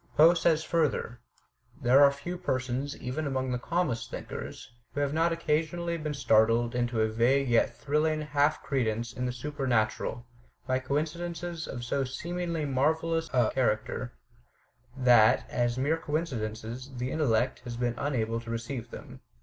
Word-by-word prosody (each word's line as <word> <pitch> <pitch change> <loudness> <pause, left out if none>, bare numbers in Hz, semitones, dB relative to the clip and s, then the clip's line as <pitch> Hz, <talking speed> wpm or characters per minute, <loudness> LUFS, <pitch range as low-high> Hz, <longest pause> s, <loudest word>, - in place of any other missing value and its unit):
Poe 160 +3 +8
says 165 -2 +2
further: 155 -7 0 0.6
*^ - - -16
There 130 +4 +6
are 140 - +7
few 170 +6 -6
persons, 130 -4 -2
even 145 +5 -3
among 130 -1 -1
the 125 - -1
calmest 125 -8 -1
thinkers, - - -7 0.2
who - - -1
have 145 0 0
not 165 +2 +2
occasionally 165 +1 -1
been 150 -1 -3
startled 115 -2 +3
into 120 -2 0
a 110 - +3
vague 120 +5 +2
yet 120 -1 +2
thrilling 155 +2 +1
half 145 0 +1
credence 120 -3 -1
in 125 0 -2
the - - -1
supernatural, 125 -3 -1 0.4
by 130 0 +1
coincidences 165 +4 -3
of 120 -2 -6
so 135 +3 0
seemingly 170 +4 -3
marvellous 160 +4 +1
a 125 -4 +3
character 125 0 -1 0.8
that, 120 -4 +5
as 120 0 0
mere 145 +5 +1
coinci 155 -4 -2
dences, 115 +5 -6
the 125 +2 -2
intellect 130 -5 +1
has 120 -2 -7
been 120 -1 0
unable 115 -5 -1
to 115 - -10
receive 115 +1 -4
them. - - -10
135 Hz, 155 wpm, -29 LUFS, 120-155 Hz, 0.8 s, Poe